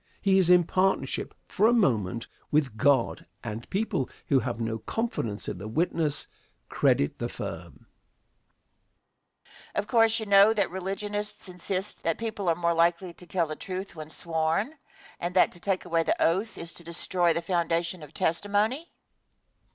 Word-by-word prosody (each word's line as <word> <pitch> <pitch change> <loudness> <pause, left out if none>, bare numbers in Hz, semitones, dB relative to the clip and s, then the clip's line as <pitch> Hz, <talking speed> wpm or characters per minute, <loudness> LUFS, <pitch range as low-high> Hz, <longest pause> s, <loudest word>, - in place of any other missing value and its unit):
He 195 -2 +4
is 180 -2 +3
in 180 -1 +7
partnership, 190 +3 0
for 215 - +2
a 235 - +4
moment, 115 - +1 0.2
with 145 -7 +1
God, 135 +1 +2 0.2
and 115 0 -6
people 195 - -1 0.2
who 135 - +5
have 120 -2 -3
no 115 -1 -2
confidence 115 - -3
in 90 - -4
the 100 - -6
witness 155 +3 0 0.4
credit 70 - +2
the - - -2
firm. - - -7
Question. - - -29
Of - - 0
course 225 -1 +4
you 220 - -4
know 200 +1 +7
the 200 -3 +2
religionists 205 +3 -4
insist 185 +2 -4
that 165 -1 0
people 215 -5 -2
are 165 - +3
more 170 0 +1
likely 170 +2 +2
to 180 - -15
tell 170 0 +1
the 155 -1 -5
truth 190 +1 -6
when 155 -1 -8
"sworn," 165 - -1 0.5
and 175 +1 -3
that 185 - +5
to 175 - -13
take 190 +1 -1
away 165 0 +2
the - - 0
oath 195 +7 +1
is 170 0 -6
to 170 - -12
destroy 170 +1 0
the 170 +1 -1
foundation 170 0 0
of 150 -2 -11
testimony? 205 - 0
175 Hz, 165 wpm, -27 LUFS, 160-200 Hz, 0.5 s, in